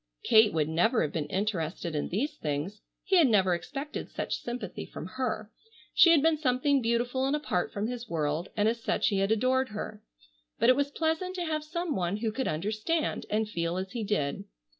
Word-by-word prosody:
Kate 220 -1 +6
would 155 -2 +1
never 175 +9 +2
have 150 - -2
been 150 -3 -2
interested 175 -3 -2
in 150 - -2
these 260 - -1
things. 155 +8 -3 0.2
He 385 -1 +3
had 330 -5 +6
never 190 -6 +4
expected 275 - -5
such - - -3
sympathy 240 -5 -5
from - - -8
her. 220 +1 -3 0.4
She 340 - +7
had 320 -4 +6
been 320 -1 +4
something 275 0 +2
beautiful 245 +3 0
and 280 - +1
apart 290 -12 -1
from 205 +1 -2
his 240 0 -5
world, 155 +2 -1
and 210 0 +3
as 230 +1 0
such - - +1
he 200 -2 0
had 195 +2 +1
adored 255 +4 +2
her. 210 0 -6 0.6
But 235 - +4
it 255 - +7
was 285 +1 0
pleasant 320 +5 -1
to 355 -2 -2
have 310 -1 -1
some 340 0 -3
one 180 +2 -1
who 220 0 -1
could 265 +4 -2
understand 215 - -1
and 215 +1 +1
feel 170 -3 -2
as 190 0 -4
he 235 -3 -3
did. 195 -9 -1
220 Hz, 205 wpm, -29 LUFS, 185-275 Hz, 0.6 s, She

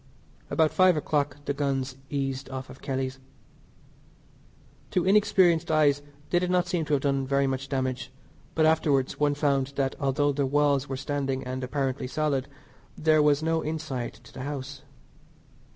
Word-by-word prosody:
About 160 -1 +3
five 185 -3 +5
o'clock 145 -2 0
the 140 - 0
guns 135 -2 -1
eased 135 -1 -3
off 130 0 -6
of 130 - -14
Kelly's. 130 -1 -3 1.7
To 180 - 0
inexperienced 185 -4 +4
eyes 145 -2 +3 0.3
they 175 - +4
did 180 0 -1
not 180 0 +2
seem 175 -2 -1
to 150 - -1
have 135 - -2
done 135 -2 0
very 140 0 +2
much 135 0 -2
damage, 130 -2 -2 0.4
but 155 - +4
afterwards 145 -4 +2
one 145 -1 +2
found 140 -2 +1
that 135 -1 0
although 145 0 +1
the 140 -1 0
walls 145 -1 +2
were 135 - -3
standing 135 -1 -2
and 130 +1 -4
apparently 135 0 -2
solid 140 -1 -1 0.5
there 155 -1 +4
was 150 0 +3
no 160 0 +1
inside 155 -6 -4
to 110 - -16
the 130 - -7
house. 140 0 -5
140 Hz, 160 wpm, -27 LUFS, 135-155 Hz, 1.7 s, five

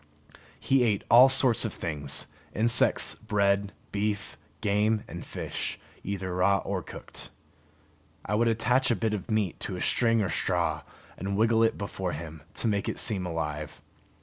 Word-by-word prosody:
He 135 -1 +2
ate 105 -4 +1
all 125 +3 +9
sorts 130 -3 +5
of 110 - -3
things, 75 -5 -1 0.3
insects, 115 +2 +3
bread, 100 -2 0 0.2
beef, 105 0 -2 0.2
game 105 +1 +1
and - - -7
fish, - - -4 0.3
either 95 -2 -4
raw 100 +2 +3
or 95 -2 -2
cooked. - - -9 1.0
I 105 - -3
would 115 +2 +2
attach 120 +3 +2
a 120 - +3
bit 110 -1 -1
of 105 0 -5
meat 110 -5 0
to - - -5
a - - -6
string 115 -2 +2
or 95 - -2
straw, - - 0 0.4
and 100 +2 -2
wiggle 115 +1 +3
it 115 - +2
before 95 -3 -4
him, 80 0 -8
to - - -1
make 100 -2 0
it - - -4
seem 95 -6 0
alive. 75 -3 -4
105 Hz, 160 wpm, -28 LUFS, 95-115 Hz, 1.0 s, all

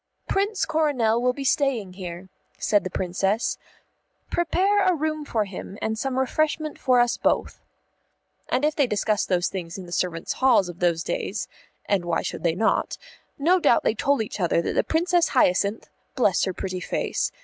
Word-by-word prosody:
"Prince 400 +1 0
Coronel 275 -8 +1
will 250 0 +3
be 275 +2 -6
staying 260 -9 0
here," 180 -1 -7 0.3
said 205 -3 +2
the 185 - -3
Princess. 190 +5 -1 0.7
"Prepare 385 +4 +2
a 370 -2 +3
room 310 -1 -2
for 220 -6 0
him 195 +1 -8
and 220 0 -1
some 260 +3 -2
refreshment 310 +3 0
for 255 -1 +3
us 240 0 +2
both." - - 0 0.9
And 260 +4 +1
if 305 0 +1
they 280 -4 +2
discussed 210 -1 0
those 180 -2 +2
things 175 -2 -6
in 190 - -8
the 175 - -12
servants' 175 -2 -2
halls 240 -8 +4
of 175 0 -9
those 170 -2 +1
days - - -3 0.4
(as 200 -3 +2
why 170 -1 -1
should - - -4
they 165 -1 +1
not?), 220 +4 0 0.4
no 345 +6 +3
doubt 240 - +3
they - - +2
told 275 +2 +1
each 210 - -7
other 175 -2 +2
that 170 - -1
the - - +2
Princess 345 +1 +2
Hyacinth 200 +1 +2 0.3
(bless 205 -8 +2
her 190 - -1
pretty 185 -1 -4
face!) - - -2
225 Hz, 180 wpm, -24 LUFS, 185-300 Hz, 0.9 s, halls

